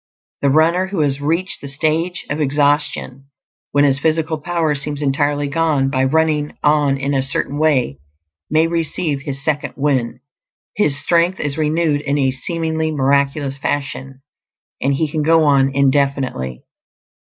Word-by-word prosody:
The 140 - +3
runner 165 +6 +3
who 190 -4 -2
has 140 -1 0
reached 170 +6 -1
the 140 - -7
stage 160 +5 -1
of 150 +2 -3
exhaustion, 145 -2 0 0.5
when 145 0 +3
his 135 -1 +3
physical 160 +1 0
power 165 -1 0
seems 145 0 -3
entirely 145 0 0
gone, 145 -3 +1
by 130 -1 +1
running 150 +1 0
on 145 -2 +3
in 140 +1 -2
a 135 - +2
Certain 140 +2 -2
Way 130 - +1 0.5
may 155 +1 +3
receive 165 -3 -2
his 140 -2 -6
"second 150 -2 -1
wind"; 135 -5 0 0.6
his 145 -9 +1
strength 170 +4 +1
is 145 -1 -2
renewed 155 -1 +1
in 145 -1 -1
a 135 -2 +2
seemingly 160 +3 -2
miraculous 140 -1 0
fashion, 135 -1 -4 0.6
and 140 +1 +1
he 160 +3 0
can 150 +1 -2
go 160 +1 +4
on 140 -2 +4
indefinitely. 135 - 0
145 Hz, 150 wpm, -18 LUFS, 135-160 Hz, 0.6 s, go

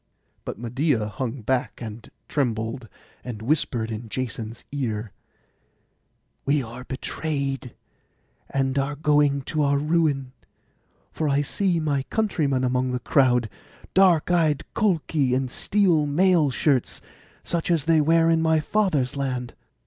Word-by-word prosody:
But - - -5
Medeia 120 +1 0
hung 125 +3 -4
back, 130 +3 -1
and 110 -1 -8 0.2
trembled, 115 -3 -2 0.4
and 120 -4 -6
whispered 120 -4 0
in 110 +1 -6
Jason's 115 -2 -5
ear, 115 -7 -3 1.3
'We 140 0 +1
are 120 +2 -9
betrayed, 135 -2 -3 0.7
and 135 0 0
are 140 +2 -1
going 145 -2 +2
to 155 +3 -2
our 140 -1 +3
ruin, 150 -3 +1 0.8
for 155 -2 -1
I 140 +1 +2
see 175 +4 0
my 145 -3 0
countrymen 150 -12 0
among 125 0 0
the 125 - -1
crowd; 125 -2 +3 0.5
dark 180 -4 +4
eyed 160 -5 +2
Colchi 160 - +1
in 130 0 0
steel 170 +1 +2
mail 170 0 +3
shirts, 135 -1 +1 0.4
such 170 0 -2
as 165 -5 +2
they 160 -1 +4
wear 165 +2 +4
in 165 0 +3
my 160 -1 +3
father's 150 - 0
land. 125 -3 -3
140 Hz, 130 wpm, -24 LUFS, 125-155 Hz, 1.3 s, dark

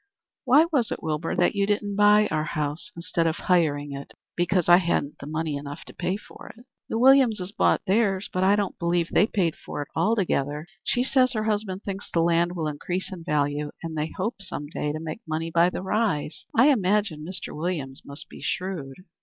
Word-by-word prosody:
"Why 275 +5 +6
was 255 -7 +2
it, - - -4
Wilbur, 155 +1 -2
that 175 - +3
you 200 -1 +1
didn't 205 -1 -1
buy 210 +1 +5
our 155 - +1
house 150 +4 -2
instead 170 0 -1
of 160 - 0
hiring 150 -6 +1
it?" 140 0 -8 0.2
"Because 175 0 +1
I 175 0 +8
hadn't 170 -5 0
money 155 +1 -2
enough 145 +2 -7
to - - -11
pay 185 +2 -2
for - - -12
it." 240 - -16 0.2
"The - - -1
Williamses 235 -7 +4
bought 215 - +2
theirs. 195 -1 +1
But 185 - +1
I 195 +2 +5
don't 205 -2 -2
believe 170 0 +1
they 205 - +4
paid 175 -8 0
for - - -7
it - - -18
altogether. 160 -6 0 0.2
She 245 - +1
says 255 -1 +3
her 215 -2 -1
husband 205 -3 -2
thinks 195 0 -5
the 165 - +1
land 170 +1 +2
will 160 -3 -2
increase 175 +6 -3
in 175 -3 -8
value, 145 -2 0
and 165 -1 -5
they 155 +1 -2
hope 205 +3 -3
some 185 -6 -5
day 150 -2 -2
to 155 - -4
make 160 +6 -6
money 160 +1 -2
by 170 +2 +4
the 180 - -5
rise. 190 -7 -1
I 255 +6 +6
imagine 200 - +1
Mr. 180 +3 -6
Williams 150 -5 -3
must 140 +1 -7
be - - -12
shrewd." 175 -8 -3
175 Hz, 205 wpm, -25 LUFS, 155-205 Hz, 0.2 s, I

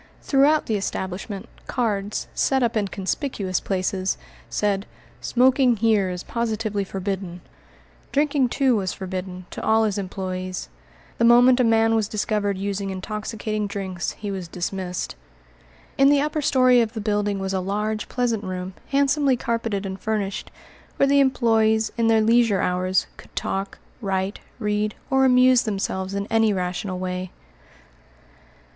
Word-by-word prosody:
Throughout 290 +2 +4
the 220 - 0
establishment 195 +1 -4 0.2
cards, 210 -4 -1
set 265 -2 +2
up 235 -1 0
in 210 -2 +1
conspicuous 195 - -2
places, 185 0 -1 0.3
said, 200 -1 0 0.3
"Smoking 255 -1 +3
here 210 -3 +2
is 180 -1 -5
positively 220 -3 -2
forbidden." 190 -2 -4 0.7
Drinking, 280 -3 +2
too, 265 -1 +2
was 190 -4 -1
forbidden 185 -1 -6
to - - -6
all 220 0 +4
his 210 -2 0
employés. 185 -1 -4 0.5
The - - +2
moment 245 +2 +6
a - - +5
man 225 -1 +4
was 220 -2 +1
discovered 205 -2 -1
using 200 0 -2
intoxicating 215 +2 -3
drinks, 190 -3 -4
he 205 -1 -5
was 190 -3 -5
dismissed. 180 +1 -4 0.8
In 275 0 +7
the 285 0 +5
upper 300 +1 -1
story 255 -3 +5
of 225 -1 -1
the 225 - -4
building 205 -1 0
was 195 0 -3
a 190 - +1
large, 210 +3 -2
pleasant 235 -4 0
room, 185 0 -5
handsomely 280 -1 +2
carpeted 230 -4 -2
and 190 0 -5
furnished, 210 -3 -2 0.5
where - - +4
the 280 0 +4
employés, 225 -4 +2
in 230 -1 +1
their 225 -1 +4
leisure 225 -2 +4
hours, 185 +1 +1
could - - -16
talk, 195 +1 -3 0.2
write, 195 -1 -1 0.2
read, 210 -2 -1 0.2
or 265 0 +4
amuse 255 -1 +6
themselves 195 -2 -2
in 200 0 -2
any 225 -1 +4
rational 185 0 -3
way. 185 0 -4
210 Hz, 145 wpm, -23 LUFS, 190-235 Hz, 0.8 s, In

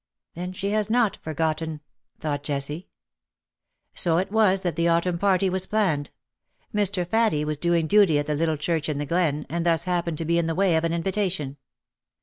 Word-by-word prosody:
^^ - - -65 0.3
Then 180 +2 -5
she 195 +2 -3
has 215 0 0
not 230 -2 +2
forgotten," 160 0 -2 0.4
thought 145 -2 -2
Jessie. 145 +3 -4 1.1
So 165 -2 +3
it 190 +3 -1
was 205 -3 +3
that 175 -4 -1
the 170 0 +1
autumn 170 +1 +1
party 195 0 +2
was 190 0 -1
planned. 185 -10 0 0.6
Mr. 200 -3 +1
Faddie 215 -7 +2
was 150 0 -2
doing 170 +1 +1
duty 195 -3 +4
at 145 - 0
the 150 - -1
little 160 +1 0
church 160 +1 -1
in 150 - -1
the 145 - -2
glen, 150 -2 0
and 170 +1 -2
thus 170 -1 +2
happened 175 -3 -1
to 165 - -3
be 170 +1 +2
in 165 - 0
the 165 - -1
way 190 -2 +3
of 160 - +1
an 165 - 0
invitation. 170 -5 -1
170 Hz, 195 wpm, -25 LUFS, 155-190 Hz, 1.1 s, duty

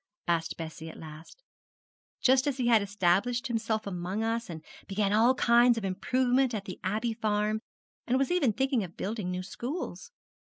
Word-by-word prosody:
asked 170 -1 0
Bessie 160 0 -7
at - - -11
last; 160 - -12 0.8
'just 260 +1 +4
as 275 -2 0
he 250 - -1
had 230 -3 +5
established 200 +5 +1
himself 225 -3 -1
among 185 +2 -3
us, 230 0 -1
and 160 -2 -7 0.2
begun 200 0 0
all 235 +4 +5
kinds 240 0 +5
of 220 - -3
improvement 250 +6 +1
at 200 -2 -4
the 185 - -7
Abbey 220 +5 -1
farm, 215 -1 0 0.5
and 255 +1 +2
was 275 +4 +1
even 345 -10 +3
thinking 265 0 0
of 175 -2 -9
building 210 -2 -3
new 180 0 -3
schools.' 260 - -5
220 Hz, 170 wpm, -29 LUFS, 185-245 Hz, 0.8 s, had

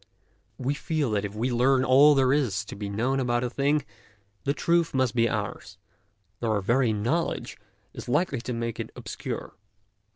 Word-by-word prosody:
We 130 +2 -1
feel 150 -3 -1
that 105 -1 0
if 100 +1 -6
we 120 +4 -1
learn 130 +2 +3
all 140 +3 +7
that - - +3
there 130 0 +3
is 120 -10 0
to - - -8
be 100 0 -5
known 120 +7 0
about 120 -1 0
a 125 - -2
thing, 145 +2 +1 0.6
the 140 - +2
truth 170 -1 +1
must 130 -4 +2
be 115 -1 +2
ours, 100 -2 -4 0.6
though 115 -2 0
our 105 - +1
very 120 +4 +2
knowledge 120 +11 -2 0.3
is - - -8
likely 140 -2 +1
to 125 +1 -4
make 115 -1 -3
it - - -4
obscure. - - -6
125 Hz, 185 wpm, -26 LUFS, 115-140 Hz, 0.6 s, all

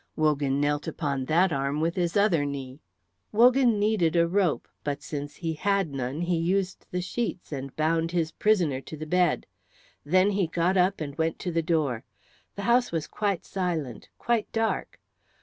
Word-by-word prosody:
Wogan 145 -3 +1
knelt 145 0 0
upon 140 -4 -2
that 170 +4 +3
arm 140 +2 -1
with 165 +2 0
his 175 +1 0
other 195 -7 +3
knee. 140 0 -5 0.5
Wogan 240 +1 +5
needed 205 -6 +2
a 170 0 +4
rope, 180 -3 +1 0.2
but 145 -1 -3
since 145 -1 -5
he 165 -2 -3
had 195 0 0
none 135 +3 -3
he 175 0 +1
used 185 +3 -1
the 180 0 -2
sheets 205 -2 -3
and 135 -2 -5
bound 160 +1 +1
his 165 -2 -1
prisoner 170 -10 +1
to 155 - -9
the 155 - -6
bed. 180 0 +2 0.6
Then 185 +6 +3
he 195 -3 +1
got 170 +3 +1
up 185 -1 +2
and 140 -2 -4
went 160 0 0
to 180 - -2
the 165 0 +1
door. 155 -8 0 0.5
The 200 - -5
house 240 +3 +3
was 165 -2 -1
quite 200 -1 -2
silent, 165 - -3
quite 235 -2 0
dark. 225 0 -1
165 Hz, 175 wpm, -27 LUFS, 145-190 Hz, 0.6 s, Wogan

